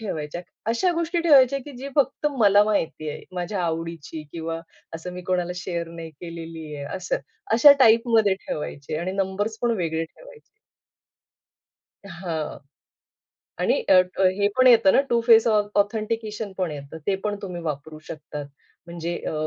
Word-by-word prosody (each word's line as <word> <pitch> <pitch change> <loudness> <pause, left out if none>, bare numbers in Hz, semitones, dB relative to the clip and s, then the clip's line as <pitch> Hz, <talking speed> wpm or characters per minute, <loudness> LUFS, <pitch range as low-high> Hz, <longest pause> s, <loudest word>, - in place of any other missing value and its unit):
ठेवायच्या. 165 -5 -4 0.3
अशा 295 +11 +2
गोष्टी 335 +1 0
ठेवायच्या 275 -5 +5
की 290 - -9
जी 275 - -6
फक्त 280 +2 +1
मला 205 -2 +6
माहिती 165 -7 -1
आहे. - - -8
माझ्या 180 +1 -2
आवडीची 165 -1 -4
किंवा 165 0 -4 0.3
असं 165 +2 -6
मी 180 - -7
कोणाला 180 -1 0
शेअर 170 -2 -4
नाही 165 -1 -8
केलेली 165 -1 -8
आहे 140 -1 -6
असं. 185 -1 -2 0.4
अशा 260 +6 +9
टाइपमध्ये 225 -4 +5
ठेवायचे 150 0 -4
आणि 185 +3 -3
नंबर्सपण 205 +4 -1
वेगळे 165 -2 -1
ठेवायचे. - - -16 1.7
हां. 170 -3 -4 1.0
आणि - - +2
अ, - - +6 0.3
अ, - - +2 0.2
हे 205 0 +3
पण 255 - +5
येतं 230 -6 +7
ना - - +5
टू 235 -1 +3
फेस 225 -1 +7
ऑ 215 -2 +4 0.2
ऑथेंटिकेशन 215 0 -3
पण 180 -4 0
येतं. 145 +2 -8
ते 200 - +2
पण 210 -1 -1
तुम्ही 180 -3 -5
वापरू 155 0 -5
शकतात. 150 -2 -7 0.4
म्हणजे 170 0 -4
अ, - - -2
185 Hz, 150 wpm, -24 LUFS, 165-225 Hz, 1.7 s, अशा